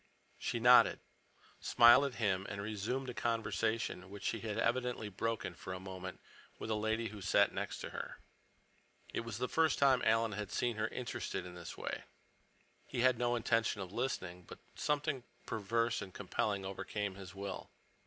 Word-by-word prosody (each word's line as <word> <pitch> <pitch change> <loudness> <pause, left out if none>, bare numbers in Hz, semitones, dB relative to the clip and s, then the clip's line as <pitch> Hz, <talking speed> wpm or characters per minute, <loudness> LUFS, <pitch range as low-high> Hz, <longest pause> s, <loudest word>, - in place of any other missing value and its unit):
She 120 - -1
nodded, 125 +2 +7 0.6
smiled 120 +4 +7
at 135 -3 -3
him, 100 -4 0
and 100 - -5
resumed 110 +6 -2
a - - -9
conversation 110 -4 -1
which 100 0 -9
she - - 0
had 110 -2 -3
evidently 120 -3 0
broken 110 -1 -2
for 90 +2 -7
a 90 - -5
moment 95 -1 -7 0.4
with 110 - -4
a - - +3
lady 110 +1 0
who 105 0 -9
sat - - +4
next - - -3
to - - -5
her. - - -6 1.0
It - - 0
was 115 -2 -4
the 125 +1 -1
first 160 +2 +3
time 135 -2 +5
Alan 115 0 +3
had 105 -1 -4
seen 120 +1 0
her 110 0 +1
interested 120 -6 -4
in 90 - -8
this 85 -1 -8
way. - - -4 0.8
He 120 - -2
had 125 -2 +4
no 120 0 +2
intention 115 -2 +1
of 95 -1 -6
listening, 90 -8 -2
but - - -10 0.2
something 145 -3 0 0.2
perverse 115 +2 0
and 100 -2 -7
compelling 100 +1 -1
overcame 100 +1 -3
his 95 -1 -10
will. 100 -1 -5
110 Hz, 175 wpm, -35 LUFS, 100-120 Hz, 1.0 s, nodded